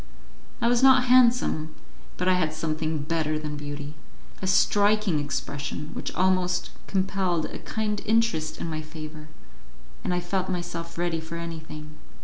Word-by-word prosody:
I 235 - +3
was 240 0 +3
not 265 -1 +7
handsome, 245 -11 +4 0.4
but 180 - -1
I 185 - +6
had 160 -4 +1
something 155 -1 -1
better 155 0 0
than 150 -1 -4
beauty 145 0 -6 0.5
a 190 - -2
striking 205 -2 +3
expression 145 +1 -4
which - - -4
almost 185 -1 +2 0.2
compelled 190 -4 0
a - - -6
kind 210 -2 -2
interest 220 -8 +1
in - - -3
my 155 -1 -3
favour, 155 0 -9 0.8
and - - -1
I 180 - +1
felt 185 +2 -2
myself 170 -2 -4
ready 170 -1 0
for 160 +1 -7
anything. 155 -2 -7
170 Hz, 145 wpm, -26 LUFS, 155-190 Hz, 0.8 s, not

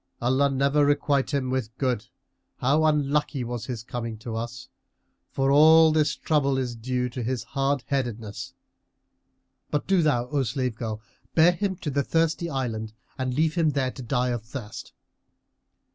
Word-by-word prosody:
Allah 130 +4 +2
never 140 +2 +2
requite 145 -1 +2
him 135 -3 -1
with 120 -4 -3
good! 125 -4 -1 0.5
How 145 +5 +2
unlucky 145 -2 +1
was 120 -1 -5
his 120 -4 -5
coming 115 -2 -5
to 110 +1 -6
us; 120 +3 -5 0.6
for 135 0 +1
all 160 +2 +7
this 155 -1 +2
trouble 140 -3 +1
is 125 -2 -2
due 125 +2 -2
to 125 +1 -5
his 120 0 -2
hard 135 0 -1
headedness! 115 -6 -3 1.1
But 150 - -1
do 190 -2 +3
thou, 140 -6 +2
O 145 0 +1
slave 130 0 -1
girl, 110 -1 -5 0.3
bear 165 +2 +6
him 190 +2 -2
to 155 -4 -4
the 140 +1 +1
Thirsty 165 +3 0
Island 115 -6 -3 0.3
and 130 -1 -1
leave 155 +2 +2
him 165 -3 +2
there 135 -3 0
to 130 - -9
die 125 +1 0
of 120 -2 -2
thirst." 115 -2 -8
130 Hz, 160 wpm, -26 LUFS, 120-145 Hz, 1.1 s, all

